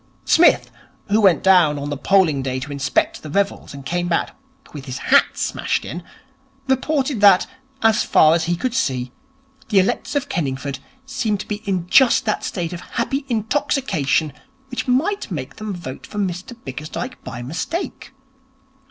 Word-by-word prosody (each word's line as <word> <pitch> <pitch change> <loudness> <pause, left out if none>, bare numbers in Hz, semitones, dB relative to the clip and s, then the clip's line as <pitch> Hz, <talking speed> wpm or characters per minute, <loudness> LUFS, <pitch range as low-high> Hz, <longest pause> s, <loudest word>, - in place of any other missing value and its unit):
Psmith, 340 - +4 0.4
who 210 +2 +3
went 185 -7 +4
down 180 -6 +5
on 145 +1 -4
the - - -1
polling 165 -2 +3
day 130 -1 -2
to 145 +2 -6
inspect 140 -1 0
the 155 - -8
revels 200 +5 -1
and 140 -1 -10
came 175 +4 -1
back 170 - -1 0.4
with 145 -3 -8
his 130 -2 -5
hat - - +3
smashed - - -1
in, 175 - -6 0.7
reported 265 -2 0
that, 200 -3 +7 0.4
as 225 -1 +4
far 155 0 +5
as 165 0 +1
he 175 +1 0
could 245 +7 -2
see, 130 - -1 0.6
the 210 - +2
electors 190 +9 +1
of 285 - 0
Kenningford 140 -3 -3 0.3
seemed 255 -7 -1
to - - -10
be 210 - -2
in 185 -4 -1
just 245 +7 +5
that 215 - -1
state 175 -2 -3
of 175 - -6
happy 270 +4 -3
intoxication 220 - 0 0.4
which 250 - -4
might 315 - 0
make 145 -8 -6
them 215 -1 -5
vote 170 -8 -7
for 210 - -9
Mr 190 +4 -3
Bickersdyke 155 - -6
by 120 -1 -7
mistake. 175 - -4
185 Hz, 165 wpm, -21 LUFS, 145-235 Hz, 0.7 s, that